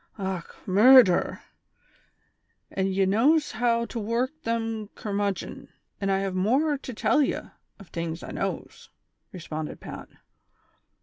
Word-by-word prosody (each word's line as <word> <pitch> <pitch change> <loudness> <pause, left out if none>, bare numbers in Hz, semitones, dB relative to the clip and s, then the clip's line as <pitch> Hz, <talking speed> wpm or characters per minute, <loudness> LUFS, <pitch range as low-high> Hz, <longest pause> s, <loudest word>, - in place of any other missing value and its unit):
" - - -35
Och, 190 -3 -4
murdher! 210 0 +6 1.3
an' 190 0 0
ye 195 0 +1
knows 275 +11 +3
how 235 0 +1
to 235 - -5
work 230 +5 -1
them 225 -3 -2
cur 210 - -5
mudgon. 200 -1 -3 0.3
An' 195 - 0
I 195 - +3
have 195 -1 -2
morer 265 +11 +1
to 260 - -7
tell 255 +5 +2
ye, 280 - +1 0.4
ov 200 - -14
tings 165 0 -4
I - - -7
knows," - - -5 0.4
responded 160 -3 -6
Pat. - - -9
210 Hz, 135 wpm, -26 LUFS, 190-235 Hz, 1.3 s, murdher